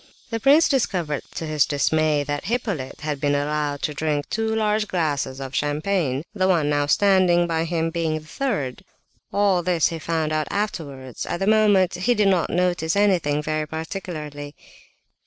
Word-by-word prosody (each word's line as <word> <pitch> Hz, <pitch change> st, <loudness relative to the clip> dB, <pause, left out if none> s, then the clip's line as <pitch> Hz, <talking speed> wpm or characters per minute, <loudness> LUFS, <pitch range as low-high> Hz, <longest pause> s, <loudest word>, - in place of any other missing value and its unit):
The 225 Hz, -, -1 dB
prince 290 Hz, +8 st, +5 dB
discovered 180 Hz, -, 0 dB
to 165 Hz, -, -4 dB
his 155 Hz, -2 st, +2 dB
dismay 150 Hz, 0 st, +1 dB
that 145 Hz, 0 st, -4 dB
Hippolyte 200 Hz, -, -3 dB
had 150 Hz, -2 st, -3 dB
been 145 Hz, -1 st, +2 dB
allowed 145 Hz, 0 st, -1 dB
to 150 Hz, -, -1 dB
drink 150 Hz, -1 st, -1 dB
two 220 Hz, 0 st, 0 dB
large 215 Hz, -1 st, +1 dB
glasses 145 Hz, -7 st, -1 dB
of 135 Hz, -1 st, -6 dB
champagne; 150 Hz, -1 st, 0 dB
the 190 Hz, -3 st, +1 dB
one 160 Hz, -6 st, +2 dB
now 145 Hz, 0 st, +1 dB
standing 185 Hz, 0 st, +4 dB
by 165 Hz, -1 st, -1 dB
him 165 Hz, -1 st, -1 dB
being 165 Hz, -2 st, -1 dB
the 155 Hz, -, -10 dB
third. 155 Hz, -, -3 dB, 0.5 s
All 200 Hz, -3 st, +2 dB
this 175 Hz, -2 st, +2 dB
he 165 Hz, -, -5 dB
found 160 Hz, -1 st, -1 dB
out 155 Hz, -1 st, 0 dB
afterwards; 140 Hz, -, -4 dB
at -, -, -2 dB
the 195 Hz, -, 0 dB
moment 205 Hz, -3 st, +4 dB
he 205 Hz, +8 st, +1 dB
did 210 Hz, -2 st, +3 dB
not 180 Hz, -4 st, +2 dB
notice 175 Hz, -2 st, 0 dB
anything, 175 Hz, -8 st, +2 dB
very 155 Hz, 0 st, -2 dB
particularly. 155 Hz, -3 st, -6 dB
160 Hz, 170 wpm, -23 LUFS, 150-195 Hz, 0.5 s, prince